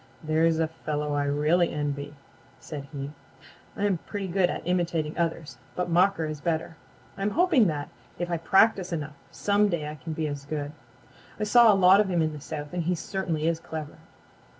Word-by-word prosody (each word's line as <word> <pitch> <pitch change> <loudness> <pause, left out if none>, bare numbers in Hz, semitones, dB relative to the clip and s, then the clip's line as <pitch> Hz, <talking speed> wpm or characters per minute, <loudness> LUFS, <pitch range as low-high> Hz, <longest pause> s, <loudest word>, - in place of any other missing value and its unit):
"There's 160 +1 +2
a 160 0 +1
fellow 150 -2 -3
I 145 0 0
really 150 +5 +2
envy," 145 0 -3 0.4
said 145 -3 -7
he. 140 -1 -5 0.7
"I'm 200 -3 +1
pretty 200 +1 -5
good 180 0 +2
at - - -4
imitating 170 -3 0
others, 160 -6 -2 0.2
but 180 -1 -2
Mocker 180 -1 +3
is 155 -2 -5
better. 160 0 -2 0.4
I'm 195 +1 +1
hoping 310 - +4
that, 145 -3 -3 0.3
if 175 0 -3
I 170 - +1
practice 190 +2 +3
enough, 155 -3 -3 0.2
some 205 0 +2
day 165 -5 -2
I 150 - -5
can 155 +2 -7
be 155 0 -2
as 145 -1 -5
good. 145 -1 -4 0.7
I - - -1
saw 230 +1 +7
a - - +4
lot 190 +1 +7
of 210 -2 +2
him 175 -3 +2
in 155 0 -1
the 150 - -8
South 150 0 -6
and 175 -2 -2
he 180 +1 +1
certainly 170 -3 -2
is 165 -1 +1
clever." 155 -2 -7
165 Hz, 190 wpm, -27 LUFS, 150-180 Hz, 0.7 s, saw